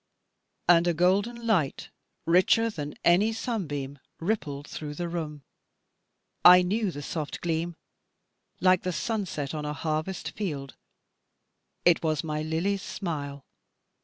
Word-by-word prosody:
And 175 0 +6
a 170 - +2
golden 200 +8 +1
light, 180 -12 0 0.3
richer 185 +7 +4
than 150 -6 -6
any 190 +6 +5
sunbeam, 145 - -3 0.2
rippled 155 -7 -2
through 150 -1 -6
the 175 +2 -3
room. 155 -4 -5 1.0
I 180 0 +9
knew 205 +3 0
the 145 -4 -6
soft 150 0 -4
gleam 170 0 -2 0.8
like 185 -1 +4
the 180 - -2
sunset 180 - -2
on 150 -1 -3
a 150 0 -3
harvest 155 +4 -3
field. 145 -10 -4 1.1
It 175 -2 +5
was 155 -1 0
my 155 -1 -2
Lily's 170 +6 -1
smile. 145 -8 -5
170 Hz, 125 wpm, -27 LUFS, 150-190 Hz, 1.1 s, I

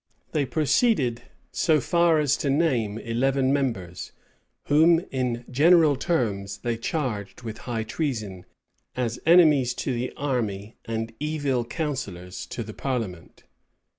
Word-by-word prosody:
They 145 -3 0
proceeded 150 - +2 0.3
so 155 -3 +2
far 170 +3 +3
as 145 -3 +2
to 140 - -1
name 130 -8 +1
eleven 130 +4 +1
members, 110 -11 -3 0.5
whom, 165 +3 +4
in 125 -2 -2
general 155 +3 +5
terms, 105 - -1
they 120 -1 -2
charged 115 -4 -3
with 110 0 -6
high 115 -2 -1
treason, 110 - -4 0.5
as 120 -2 -2
enemies 150 -8 +5
to 130 - -2
the 125 +1 -2
army 110 -7 -2
and 115 0 -3
evil 145 -5 -1
counsellors 115 - -5
to 120 - -5
the 110 0 -9
parliament. 115 -11 -4
125 Hz, 125 wpm, -25 LUFS, 110-150 Hz, 0.5 s, general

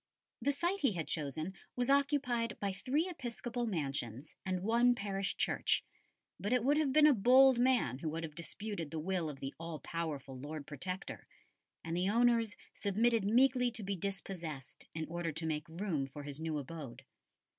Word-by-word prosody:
The 285 - +2
site 345 +7 0
he 270 - +3
had 165 -3 -3
chosen 155 +3 -2 0.2
was 245 +2 +2
occupied 275 -5 +2
by 200 -1 0
three 260 - 0
episcopal 240 -6 -4
mansions 140 - -3
and 185 -1 -2
one 240 +3 +4
parish 195 -3 -2
church; - - +2 0.6
but 205 - -2
it 250 -2 +3
would 285 +4 +4
have 305 -3 +2
been 300 +2 +6
a 300 - +8
bold 255 +3 +6
man 245 - +3
who 155 - -2
would 165 +2 -3
have 155 -2 -5
disputed 170 +1 -5
the 160 - -4
will 170 0 -1
of 140 -2 -8
the 135 0 -4
all 165 -1 -5
powerful 145 -5 -4
Lord 145 +1 -6
Protector, 180 +7 -5 0.6
and 165 0 -3
the 180 +2 +1
owners 230 -1 +3 0.2
submitted 220 +1 +2
meekly 250 +3 +4
to 225 -2 -6
be 200 0 -1
dispossessed 175 -7 -5
in 160 0 -2
order 170 0 -2
to 160 +2 -2
make 155 0 -2
room 165 -5 -2
for 145 +2 -9
his 145 +1 -6
new 160 -1 -1
abode. 145 -2 -7
190 Hz, 175 wpm, -34 LUFS, 160-240 Hz, 0.6 s, a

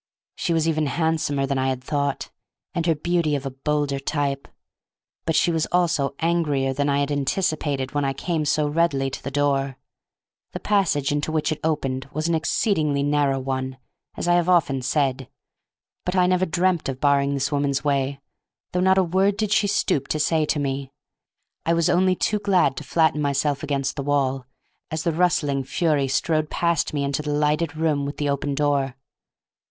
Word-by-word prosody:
She 175 - -2
was 165 -1 +2
even 155 -2 +1
handsomer 155 -3 0
than 135 0 -1
I 130 - +1
had 130 -1 -3
thought, 145 -1 -2 0.4
and 170 0 -1
her 165 - +3
beauty 165 -1 0
of 140 -1 -4
a 135 - -3
bolder 140 +1 -1
type, 140 -1 -2 0.8
but 165 - 0
she 175 - +3
was 160 -1 0
also 160 -6 +1
angrier 150 -6 0
than 145 +2 0
I 140 0 +2
had 140 +1 -1
anticipated 145 -2 -1
when 145 -1 0
I 135 0 0
came 160 +3 -2
so 150 0 +1
readily 145 -4 +1
to - - -6
the - - -3
door. 140 -1 0 0.8
The - - -4
passage 180 -9 +1
into 145 +2 -1
which 155 -1 0
it 155 - -2
opened 135 -4 -1
was 155 +2 -2
an 170 - +1
exceedingly 160 -3 +1
narrow 145 -2 +1
one, 130 0 -3 0.4
as - - -3
I 175 - +4
have 175 0 +2
often 155 -7 +3
said, 135 -1 0 0.7
but 180 - -2
I 180 -1 +4
never 185 +1 +2
dreamt 175 -2 +1
of 130 -1 -4
barring 140 -1 +2
this 135 +1 -1
woman's 140 -2 0
way, 140 -1 0 0.5
though 180 - -1
not 190 +1 +4
a 190 - +5
word 190 +3 +1
did 215 -2 -1
she 210 - +3
stoop 200 -9 0
to 155 - -1
say 155 0 +2
to - - 0
me. 135 -1 -3 0.7
I 165 - +2
was 170 +1 +2
only 185 +1 +3
too 210 +3 0
glad 195 -3 +2
to - - -5
flatten 160 -2 +2
myself 140 0 0
against 140 -2 -2
the - - -1
wall, 135 -2 0 0.4
as 160 0 -3
the 170 - +1
rustling 150 -5 +1
fury 150 -1 +1
strode 155 +3 0
past 170 -3 0
me 145 -2 -1
into 140 +1 -1
the 150 - -5
lighted 150 +1 0
room 155 -3 0
with 145 - -6
the 145 -1 -1
open 140 0 -1
door. 140 -3 0
145 Hz, 190 wpm, -23 LUFS, 140-165 Hz, 0.8 s, a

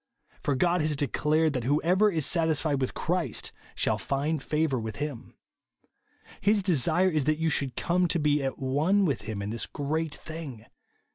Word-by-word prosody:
For 145 - 0
God 175 +5 +2
has 150 0 +1
declared, 150 +3 +1
that 125 -3 -2
whoever 170 - +3
is 160 -5 0
satisfied 160 -4 +1
witli 130 - -2
Christ 175 +1 -2 0.2
shall - - 0
find 145 +3 -1
favDur 150 -4 0
with 110 -1 -5
him. 145 -5 -6 1.1
His 205 0 +3
desire 175 +1 +3
is 155 -4 0
that 155 0 +2
you 160 0 0
should 140 -3 0
come 180 +1 +1
to 175 - 0
be 150 -2 +2
at 135 -1 -2
one 155 +10 +2
with 140 -8 0
him 100 -2 -3
in 100 - -4
this 115 - -3
great 155 +2 -2
thing. 150 -9 -8
155 Hz, 170 wpm, -28 LUFS, 135-165 Hz, 1.1 s, whoever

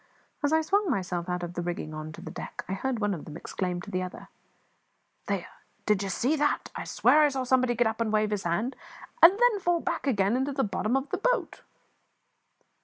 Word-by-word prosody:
As 290 0 +1
I 320 0 +4
swung 395 +4 +1
myself 180 - -2
out 180 0 -2
of 175 0 -5
the 175 - -3
rigging 170 -3 -4
on 155 0 -6
to 170 - -10
the - - -8
deck - - -7
I 190 - -3
heard 250 +6 -2
one 205 -2 0
of 165 - -6
them 155 0 -8
exclaim 180 0 -3
to - - -9
the 185 - -1
other 185 0 -7 1.0
"There, - - -1 0.4
did 210 -2 +2
ye 195 - -2
see 255 +10 +1
that? 295 0 0
I - - -4
swear 310 - +4
I 300 - +5
saw 265 -2 -2
somebody 255 -1 +2
get 240 +1 +3
up 220 +1 -1
and 225 -2 0
wave 215 0 +2
his 205 -2 -1
hand, 185 +10 -1 0.5
and 360 +4 +9
then 485 -4 +4
fall 350 -2 +1
back 330 -3 -3
again 205 -3 +2
into 265 +2 0
the 270 0 +1
bottom 215 +4 0
of 270 +2 -3
the - - -1
boat!" - - 0
220 Hz, 225 wpm, -28 LUFS, 185-285 Hz, 1.0 s, and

